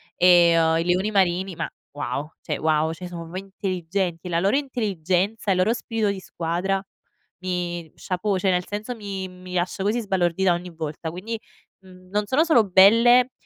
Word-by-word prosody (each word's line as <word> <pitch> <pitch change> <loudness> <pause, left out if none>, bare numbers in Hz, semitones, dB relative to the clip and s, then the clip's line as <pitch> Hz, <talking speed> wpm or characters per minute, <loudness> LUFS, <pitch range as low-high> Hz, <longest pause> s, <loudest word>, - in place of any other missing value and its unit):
e, 180 - +4 0.2
ehm, 165 -1 +3
i 165 - +1
leoni 180 +4 +1
marini 190 -2 +1
ma 165 - -3 0.3
wow, 145 +1 -3
cioè - - -3
wow. 155 0 +1
Cioè 180 +2 -8
sono 175 -1 -7
proprio 165 +2 -8
intelligenti. 185 -2 -3
La 170 -1 +1
loro 195 +7 +2
intelligenza 205 - -1
e - - +5
il - - -1
loro 185 +5 +3
spirito 225 -3 -1
di 200 - -5
squadra 180 +2 -2 0.6
mi 175 -3 -3
chapeau, 190 +2 -2
cioè 190 - +1
nel 180 0 0
senso 215 +4 -4
mi 200 -3 -5
mi 180 0 -11
lascia 180 +1 -1
così 210 +4 +1
sbalordita 190 -2 +1
ogni 175 +1 -5
volta 160 0 -5
quindi, 210 +7 -5 0.4
mhmm, 185 -1 -17
non 210 +2 0
sono 265 +9 +3
solo 280 -9 +5
belle, 230 +7 +6
185 Hz, 180 wpm, -24 LUFS, 175-205 Hz, 0.6 s, belle